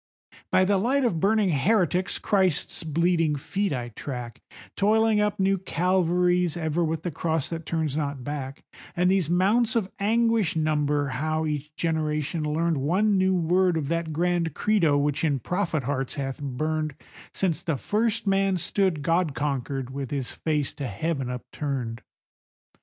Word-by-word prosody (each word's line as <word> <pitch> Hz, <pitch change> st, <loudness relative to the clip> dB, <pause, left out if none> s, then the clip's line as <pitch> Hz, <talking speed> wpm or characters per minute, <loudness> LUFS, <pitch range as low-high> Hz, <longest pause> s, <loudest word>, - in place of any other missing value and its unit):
By 185 Hz, -, +4 dB
the 200 Hz, +1 st, +3 dB
light 260 Hz, +6 st, +2 dB
of 175 Hz, -9 st, +1 dB
burning 205 Hz, +2 st, +3 dB
heretics 180 Hz, +3 st, +2 dB
Christ's 185 Hz, -7 st, 0 dB
bleeding 165 Hz, 0 st, +1 dB
feet 195 Hz, +7 st, -2 dB
I 120 Hz, -3 st, -3 dB
track, 120 Hz, 0 st, -7 dB, 0.3 s
Toiling 215 Hz, +1 st, +3 dB
up 210 Hz, -1 st, 0 dB
new 195 Hz, 0 st, +2 dB
Calvaries 180 Hz, -1 st, +1 dB
ever 160 Hz, +1 st, 0 dB
with 160 Hz, 0 st, -2 dB
the 175 Hz, -, -2 dB
cross 160 Hz, 0 st, -1 dB
that 165 Hz, -1 st, -6 dB
turns 160 Hz, -4 st, -1 dB
not 140 Hz, -4 st, -2 dB
back, 140 Hz, -1 st, -5 dB, 0.3 s
And 180 Hz, +1 st, +3 dB
these 190 Hz, -5 st, +1 dB
mounts 215 Hz, +7 st, +2 dB
of 205 Hz, -5 st, 0 dB
anguish 225 Hz, -2 st, +2 dB
number 150 Hz, -2 st, +1 dB
how 155 Hz, +4 st, -1 dB
each 150 Hz, 0 st, -4 dB
generation 155 Hz, -1 st, -1 dB
learned 160 Hz, +2 st, 0 dB
One 190 Hz, +9 st, +2 dB
new 190 Hz, 0 st, +3 dB
word 180 Hz, +1 st, +2 dB
of 145 Hz, -3 st, -2 dB
that 165 Hz, -1 st, -1 dB
grand 170 Hz, -1 st, 0 dB
Credo 170 Hz, -9 st, +2 dB
which 145 Hz, +1 st, 0 dB
in 150 Hz, -4 st, +2 dB
prophet 165 Hz, -, -1 dB
hearts 135 Hz, 0 st, -2 dB
hath 135 Hz, 0 st, -4 dB
burned 155 Hz, +2 st, -2 dB, 0.4 s
Since 175 Hz, -6 st, -1 dB
the 160 Hz, -4 st, -1 dB
first 225 Hz, -, 0 dB
man 195 Hz, -1 st, +2 dB
stood 180 Hz, -3 st, 0 dB
God 165 Hz, -3 st, +1 dB
conquered 135 Hz, -2 st, -2 dB
with 135 Hz, -1 st, -5 dB
his 135 Hz, -3 st, -3 dB
face 150 Hz, -3 st, -1 dB
to 140 Hz, -, -5 dB
heaven 135 Hz, +5 st, -2 dB
upturned. 125 Hz, -2 st, -4 dB
160 Hz, 155 wpm, -26 LUFS, 145-190 Hz, 0.4 s, By